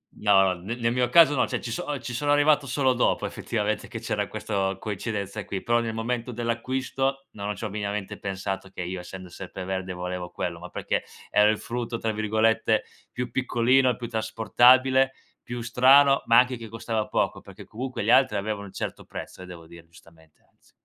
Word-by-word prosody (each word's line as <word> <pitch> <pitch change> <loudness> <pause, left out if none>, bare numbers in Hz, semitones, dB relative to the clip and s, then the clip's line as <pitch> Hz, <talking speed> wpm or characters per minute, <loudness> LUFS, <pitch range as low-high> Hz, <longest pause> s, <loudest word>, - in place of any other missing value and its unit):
No 100 -2 +4
no, 95 -1 +2
ne 105 +6 -4
nel 115 -1 0
mio 125 -1 +1
caso 165 +1 +7
no, 135 - +2
cioè - - -2
ci 115 - -6
so 145 +4 -3
ci 125 - -6
sono 145 +4 0
arrivato 145 -1 +4
solo 130 0 +2
dopo 125 - +1
effettivamente, - - -2
che - - -6
c'era - - -2
questo 95 -1 -2
coincidenza 105 0 -4
qui, 95 -1 -5
però 120 0 +2
nel 115 -1 -3
momento 120 +2 -2
dell'acquisto, 130 +3 -2
non 105 0 -4
c'ho 110 +3 -4
minimamente 100 -1 -4
pensato 95 0 -4
che 90 - -6
io 90 +1 -4
essendo 90 0 -9
Serpeverde 95 +1 -5
volevo 90 0 -5
quello, 85 -1 -4
ma 90 - -9
perché - - -2 0.3
era 105 0 +5
il 110 - +1
frutto, 120 -1 -4
tra 115 -1 -1
virgolette, 110 +1 +1 0.3
"più 125 0 -4
piccolino", 125 0 +2
più 120 - -6
trasportabile, 125 +4 +4 0.3
più 120 0 -5
strano, 135 +4 +5
ma 115 0 +6
anche 125 0 +2
che 115 -2 -9
costava 110 -1 -3
poco, - - -1
perché 100 0 -12
comunque 125 +1 -5
gli 110 - +2
altri 130 -5 +5
avevano 100 0 -3
un 95 - -14
certo - - -5
prezzo, - - -8
eh, - - -8
devo 85 -2 -10
dire 85 0 -14
giustamente, 80 -1 -21
anzi. - - -30
110 Hz, 190 wpm, -26 LUFS, 95-125 Hz, 0.3 s, caso